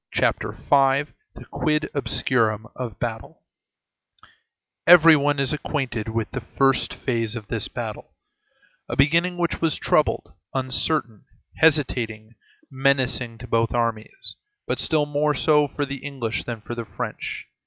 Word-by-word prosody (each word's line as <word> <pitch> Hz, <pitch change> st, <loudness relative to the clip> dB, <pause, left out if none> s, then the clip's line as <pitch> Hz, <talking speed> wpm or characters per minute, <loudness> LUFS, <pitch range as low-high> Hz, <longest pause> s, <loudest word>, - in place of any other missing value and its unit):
CHAPTER -, -, 0 dB
V—THE 140 Hz, -, 0 dB
QUID 150 Hz, -1 st, 0 dB
OBSCURUM 115 Hz, -6 st, 0 dB
OF 120 Hz, -6 st, -6 dB
BATTLES -, -, -5 dB, 1.5 s
Every 165 Hz, -2 st, +9 dB
one 145 Hz, 0 st, +1 dB
is 135 Hz, 0 st, 0 dB
acquainted 130 Hz, -7 st, -3 dB
with 110 Hz, -1 st, -3 dB
the 135 Hz, -, -4 dB
first 135 Hz, +3 st, +1 dB
phase 115 Hz, -3 st, -2 dB
of 110 Hz, -4 st, -8 dB
this -, -, -1 dB
battle; -, -, -7 dB, 0.7 s
a -, -, -2 dB
beginning 170 Hz, +6 st, +3 dB
which 170 Hz, -1 st, -1 dB
was 165 Hz, -3 st, +1 dB
troubled, -, -, +1 dB, 0.2 s
uncertain, 130 Hz, -3 st, 0 dB, 0.3 s
hesitating, 120 Hz, -8 st, +1 dB, 0.4 s
menacing 130 Hz, -3 st, +1 dB
to 125 Hz, +2 st, -10 dB
both 115 Hz, 0 st, +1 dB
armies, 115 Hz, -, -3 dB, 0.3 s
but -, -, -2 dB
still 155 Hz, -2 st, +2 dB
more 145 Hz, 0 st, 0 dB
so 150 Hz, +1 st, +3 dB
for 145 Hz, +1 st, -3 dB
the 140 Hz, 0 st, -5 dB
English 130 Hz, -6 st, -4 dB
than 115 Hz, -3 st, -5 dB
for 120 Hz, -, -7 dB
the 115 Hz, -1 st, -5 dB
French. -, -, -6 dB
135 Hz, 130 wpm, -23 LUFS, 115-150 Hz, 1.5 s, Every